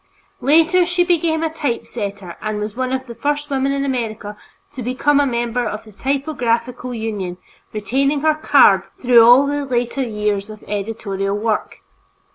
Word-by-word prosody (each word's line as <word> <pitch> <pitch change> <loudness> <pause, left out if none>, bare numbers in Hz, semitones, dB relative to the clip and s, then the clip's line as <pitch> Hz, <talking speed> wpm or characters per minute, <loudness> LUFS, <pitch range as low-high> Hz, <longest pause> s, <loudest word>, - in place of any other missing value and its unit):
Later 325 +6 +4
she 350 +1 +1
became 330 -2 +1
a 320 -1 -2
typesetter 205 - -4
and 215 -1 -3
was 210 0 -4
one 255 0 -2
of 260 0 -2
the 235 - -8
first 290 +4 -2
women 270 0 +1
in 275 0 -1
America 225 -5 -3 0.4
to 260 - -7
become 260 +4 +1
a 285 - +3
member 240 0 -1
of 215 -1 -4
the 220 - -15
typographical 250 -1 -2
union, 210 -6 -4 0.3
retaining 275 +7 0
her 310 0 +3
"card" 275 - +5 0.2
through 245 -2 +6
all 245 +4 +7
the 290 0 -1
later 245 0 -1
years 210 -4 -2
of 215 -1 -11
editorial 200 -1 -3
work. 215 0 -2
245 Hz, 160 wpm, -19 LUFS, 215-280 Hz, 0.4 s, all